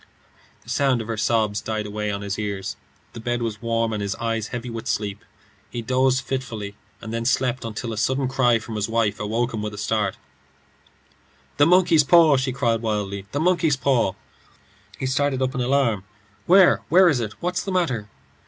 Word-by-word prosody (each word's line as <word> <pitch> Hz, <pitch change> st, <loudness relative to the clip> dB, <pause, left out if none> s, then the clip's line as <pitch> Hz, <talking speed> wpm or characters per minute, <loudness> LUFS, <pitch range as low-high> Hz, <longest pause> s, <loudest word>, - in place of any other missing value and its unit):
The -, -, -15 dB
sound 135 Hz, -3 st, +2 dB
of 110 Hz, -, -5 dB
her 115 Hz, -, -2 dB
sobs 105 Hz, -1 st, +1 dB
died 110 Hz, -1 st, -3 dB
away 105 Hz, 0 st, -3 dB
on 100 Hz, 0 st, -3 dB
his 100 Hz, +1 st, -3 dB
ears. 100 Hz, -2 st, -3 dB, 0.4 s
The 115 Hz, -, -8 dB
bed 120 Hz, +1 st, -2 dB
was 110 Hz, -2 st, -4 dB
warm, 115 Hz, -1 st, 0 dB
and 105 Hz, -, -2 dB
his 100 Hz, 0 st, -2 dB
eyes 115 Hz, -2 st, -2 dB
heavy 120 Hz, 0 st, -5 dB
with 115 Hz, -1 st, -6 dB
sleep. 105 Hz, -1 st, -2 dB, 0.5 s
He 120 Hz, -1 st, -5 dB
dozed 130 Hz, +2 st, +1 dB
fitfully, 110 Hz, -6 st, -4 dB, 0.3 s
and 110 Hz, -, -7 dB
then 115 Hz, 0 st, -2 dB
slept 125 Hz, 0 st, 0 dB
until 115 Hz, +1 st, -4 dB
a -, -, -6 dB
sudden 130 Hz, +5 st, +1 dB
wild 130 Hz, -, -1 dB
cry 125 Hz, -3 st, +3 dB
from 110 Hz, 0 st, -6 dB
his 105 Hz, +1 st, -2 dB
wife 110 Hz, -2 st, 0 dB
awoke 115 Hz, +4 st, -1 dB
him 110 Hz, -, -3 dB
with 105 Hz, 0 st, -4 dB
a -, -, -11 dB
start. 105 Hz, -2 st, -1 dB, 1.4 s
"The 170 Hz, 0 st, +5 dB
paw!" 165 Hz, -4 st, +7 dB
she 130 Hz, 0 st, -1 dB
cried 115 Hz, -3 st, 0 dB
wildly. 100 Hz, -3 st, -3 dB
"The 145 Hz, -, -2 dB
monkey's 165 Hz, -4 st, +2 dB
paw!" 130 Hz, -7 st, +2 dB, 0.8 s
He -, -, -4 dB
started 135 Hz, 0 st, 0 dB
up 130 Hz, 0 st, 0 dB
in 130 Hz, -, -2 dB
alarm. 125 Hz, -6 st, +1 dB, 0.4 s
"Where? 185 Hz, 0 st, +6 dB
Where 180 Hz, +4 st, +6 dB
is 145 Hz, -7 st, +3 dB
it? 110 Hz, -3 st, -3 dB
What's 180 Hz, +1 st, -1 dB
the 195 Hz, -, -4 dB
matter?" 130 Hz, -, -1 dB
115 Hz, 190 wpm, -23 LUFS, 105-135 Hz, 1.4 s, paw